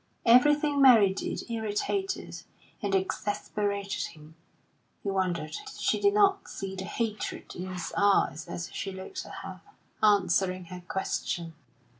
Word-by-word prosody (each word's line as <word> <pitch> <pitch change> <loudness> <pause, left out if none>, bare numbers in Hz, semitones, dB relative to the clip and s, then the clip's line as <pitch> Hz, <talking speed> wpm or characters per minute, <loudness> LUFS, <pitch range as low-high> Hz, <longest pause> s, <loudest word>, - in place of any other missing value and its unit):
Everything 290 +4 +5
Mary 225 -8 +7
did 195 - -4
irritated 230 - -2 0.4
and 200 -1 0
exasperated 200 +1 -1
him; 155 0 -15 0.7
he 200 - -1
wondered 180 -5 -1 0.2
she - - +1
did 405 0 +4
not 395 -1 +3
see 195 -1 -5
the 190 0 -5
hatred 215 0 -3
in 180 +1 -5
his 180 -2 -5
eyes 200 -6 +2
as 170 - -4
he 195 - -4
looked 190 - -7
at - - -10
her, - - -8 0.4
answering 185 -3 +3
her 180 +1 -9
question. 175 -3 -2
200 Hz, 130 wpm, -29 LUFS, 185-230 Hz, 0.7 s, Mary